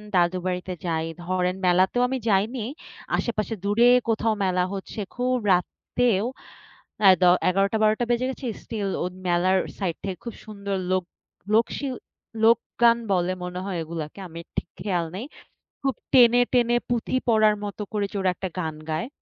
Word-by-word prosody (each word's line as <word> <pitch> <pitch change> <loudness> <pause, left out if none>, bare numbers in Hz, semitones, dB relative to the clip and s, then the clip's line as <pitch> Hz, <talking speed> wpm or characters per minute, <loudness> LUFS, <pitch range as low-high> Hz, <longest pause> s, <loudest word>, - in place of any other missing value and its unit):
দাদুর 180 +1 +2
বাড়িতে 180 0 -3
যাই 160 -1 0 0.2
ধরেন 185 0 0
মেলাতেও 185 +7 +3
আমি 265 - -1
যাইনি। 215 +4 +1 0.5
আশেপাশে 225 -1 -2
দূরে 210 +4 +4 0.2
কোথাও 225 0 +2
মেলা 185 -1 +2
হচ্ছে 195 +2 -6 0.2
খুব 250 +1 +1 0.2
রাতেও 210 +4 0 0.8
এ - - +10
দ - - +4 0.3
১১ঃ০০, 195 +3 +2
১২ঃ০০ 215 +3 +3
বেজে 240 +1 +1
গেছে, 265 - -8 0.2
স্টিল 210 -4 -3
ও - - -1 0.2
মেলার 180 +2 +3 0.2
সাইড 180 -4 -1
থেকে 190 -3 -3
খুব 235 - -5
সুন্দর 200 -2 -4 0.2
লোক, 185 -1 +2 0.5
লোক 225 +1 +5
শিল 270 -3 -3 0.5
লোকগান 235 +1 +4
বলে 180 0 +2
মনে 180 0 -4
হয় 185 -4 -3
ওগুলাকে 160 +2 -6
আমার 170 0 -9
ঠিক - - -1
খেয়াল 180 -4 0
নেই। 230 - -5 0.6
খুব 270 -1 +1 0.2
টেনে, 245 -1 +7
টেনে 240 -1 +3
পুঁথি 240 +1 0
পড়ার 215 -2 +5
মতো 205 +1 -5
করে 205 -1 0
যে - - -5
ওরা 185 -1 +2
একটা 190 - -4
গান 160 -3 -3 0.2
গায়। 160 +10 -2
200 Hz, 160 wpm, -25 LUFS, 180-235 Hz, 0.8 s, এ